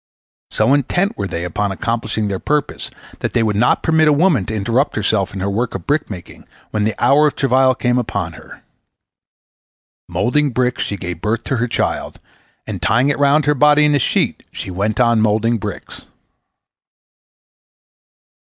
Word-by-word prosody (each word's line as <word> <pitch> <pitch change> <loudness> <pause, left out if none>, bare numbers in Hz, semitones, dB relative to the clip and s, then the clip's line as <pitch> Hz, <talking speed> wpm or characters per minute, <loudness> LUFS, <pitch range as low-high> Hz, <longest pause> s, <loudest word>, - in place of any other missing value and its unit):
So 110 +5 +2
intent 175 +8 +1
were 100 - -3
they 85 -1 -4
upon 100 +4 -2
accomplishing 110 +1 -2
their 95 -2 -3
purpose 150 -1 -2 0.3
that - - -3
they 115 - +2
would 105 -2 0
not 115 +4 +2
permit 160 -1 +3
a 150 - +5
woman 145 - +2
to 110 - -3
interrupt 115 +7 0
herself 100 -2 0
in 95 -1 -6
her 95 - -1
work 115 +4 -2
of 95 - -6
brick 150 +1 0
making 90 -5 -10 0.2
when 105 -1 0
the 110 -1 -1
hour 150 +2 +4
of 150 - -2
travail 130 -1 +3
came 125 -1 +1
upon 120 - -3
her. - - -14 1.5
Moulding 150 +4 +1
bricks 125 0 -1
she 100 - -4
gave 90 -2 -6
birth 115 +2 -1
to 130 - -2
her 120 +1 0
child, - - -2 0.5
and, 100 -5 -6
tying 110 +9 +2
it 145 - -1
round 145 +1 +3
her 150 - +3
body 150 +1 +4
in 150 - +3
a 145 - +3
sheet, - - 0
she - - -6
went 105 +6 -2
on 115 -2 +3
moulding 110 +2 +1
bricks. - - -8
115 Hz, 175 wpm, -18 LUFS, 105-140 Hz, 1.5 s, a